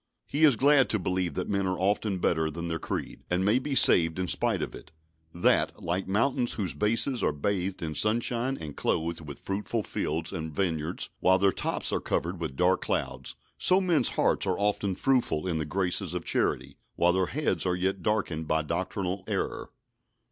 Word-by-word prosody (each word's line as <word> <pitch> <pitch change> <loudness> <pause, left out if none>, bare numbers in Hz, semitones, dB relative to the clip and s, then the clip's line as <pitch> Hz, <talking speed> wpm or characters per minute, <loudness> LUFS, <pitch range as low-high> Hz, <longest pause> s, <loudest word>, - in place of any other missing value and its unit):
He 150 +3 +3
is 140 -5 +5
glad 140 +2 +5
to 110 - +1
believe 90 -4 -2
that - - -2
men 100 -1 0
are 95 0 -1
often 100 +1 0
better 80 -3 +1
than 85 +2 -5
their 80 0 -2
creed, - - -5
and 90 +1 +1
may 110 +5 +3
be 135 +1 -3
saved 80 -9 +5
in 90 0 -1
spite - - +1
of - - -5
it; 80 - -12 0.4
that, 85 +2 +1
like 90 +3 -2
mountains 120 +5 +1
whose 95 -8 -2
bases 115 - +1
are - - +2
bathed 95 +4 -2
with 80 -2 -4
sunshine 120 +4 +1
and 75 -2 -7
clothed 85 +1 -1
with 75 -3 -8
fruitful 105 +3 -3
fields 80 -1 -3
and 80 -4 -5
vineyards, 85 -3 -2
while 95 0 +4
their 100 0 +3
tops - - -1
are - - +1
covered 85 +1 -2
with 80 -5 -4
dark 90 +3 +2
clouds, - - -3 0.2
so 185 +1 +5
men's 175 -9 +3
hearts - - +2
are 95 - 0
often 100 -2 0
fruitful 120 - +1
in 85 -3 -1
the 80 - -2
graces 90 +1 -1
of 90 - -4
charity, - - 0 0.2
while 90 +1 +3
their 95 -1 +1
heads 150 +2 -1
are 90 - +1
yet 95 +1 -1
darkened 85 -7 -1
by 80 0 +1
doctrinal 95 +3 -3
error. - - -3
95 Hz, 190 wpm, -28 LUFS, 85-105 Hz, 0.4 s, is